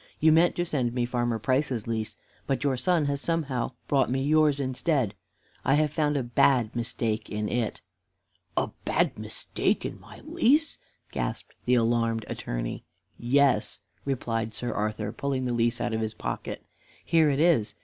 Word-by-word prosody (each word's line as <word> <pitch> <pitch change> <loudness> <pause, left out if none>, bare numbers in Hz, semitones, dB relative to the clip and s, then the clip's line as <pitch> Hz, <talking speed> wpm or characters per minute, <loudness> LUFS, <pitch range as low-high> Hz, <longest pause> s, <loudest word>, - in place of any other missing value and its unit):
"You 160 +1 +5
meant 165 +2 +4
to 175 - 0
send 125 -8 -1
me 120 -1 +1
Farmer 120 -1 0
Price's 130 -1 0
lease, 110 -2 -3 0.3
but 135 -1 0
your 140 -2 +2
son 170 +3 +2
has 140 0 -1
somehow 140 -7 -1
brought 140 -2 +2
me 135 +1 0
yours 150 -1 +3
instead. 130 - 0 0.5
I 135 - +3
have 150 -1 +2
found 150 -2 +1
a 135 - 0
bad 120 -1 +3
mistake 115 -2 -2
in 105 0 -2
it." 120 -1 -2 0.8
"A - - +2
bad - - +1
mistake - - -1
in - - -5
my - - -13
lease!" 300 +6 +2 0.3
gasped - - -3
the 125 - +4
alarmed 115 -1 +1
Attorney. - - -4 0.4
"Yes," 135 +2 +3 0.3
replied 115 -5 -2
Sir 120 +3 -2
Arthur, 105 0 -2
pulling 130 +2 -2
the 125 - 0
lease 120 0 +1
out - - -1
of 110 - 0
his 110 0 -3
pocket. - - -5 0.4
"Here 160 -2 +4
it 140 0 +1
is. 155 -10 +3
125 Hz, 165 wpm, -27 LUFS, 115-145 Hz, 0.8 s, You